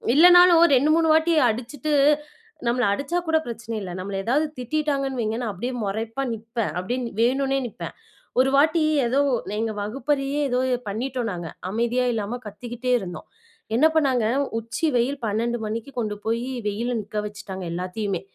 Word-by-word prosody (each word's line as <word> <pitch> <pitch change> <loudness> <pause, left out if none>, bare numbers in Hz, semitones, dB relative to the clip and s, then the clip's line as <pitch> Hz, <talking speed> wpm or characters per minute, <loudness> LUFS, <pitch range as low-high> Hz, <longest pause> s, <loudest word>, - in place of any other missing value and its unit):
இல்லனாலும் 355 +1 +8
2, 275 +4 +3
3 330 -1 +3
வாட்டி 320 +2 +3 0.2
அடிச்சுட்டு 250 +6 -3 0.8
நம்மள 245 +1 +2
அடிச்சா 285 +10 -2
கூட 320 0 +3
பிரச்சன 230 -1 -6
இல்ல. 185 - -6
நம்மள 195 +1 -4
எதாவது 290 +6 +2
திட்டிட்டாங்கன்னு 275 0 -1
வைங்க, 220 +1 -1
நான் 230 -3 -2
அப்படியே 240 +8 -4
மொறைப்பா 225 +6 -3
நிப்பேன், 225 -4 -3
அப்படியே 195 +8 -2 0.2
வேணும்னே 270 +3 +2
நிப்பேன். - - -7 0.5
ஒரு 265 +1 +5
வாட்டி, 315 +3 +4 0.2
ஏதோ 265 +4 +1 0.4
எங்க 225 -1 -1
வகுப்பறையே 275 +5 -1
ஏதோ 250 +1 +1 0.3
பண்ணிட்டோம், 240 +2 -2
நாங்க. 170 -2 -5 0.2
அமைதியா 235 +3 +1
இல்லாம 225 +2 -3
கத்திக்கிட்டே 240 +4 -4
இருந்தோம். 175 -5 -8 0.5
என்ன 300 - +5
பண்ணாங்க? 265 -7 +2 0.3
உச்சி 230 +9 -2
வெயில், 265 +4 0
12 235 +3 -1
மணிக்கு 225 +5 -5
கொண்டு 210 -2 -2
போய் 230 +2 0 0.2
வெயில்ல 235 +4 -1
நிக்க 210 +1 -7
வச்சுட்டாங்க 200 -3 -7
எல்லாத்தையுமே. 185 +1 -3
240 Hz, 145 wpm, -24 LUFS, 215-275 Hz, 0.8 s, இல்லனாலும்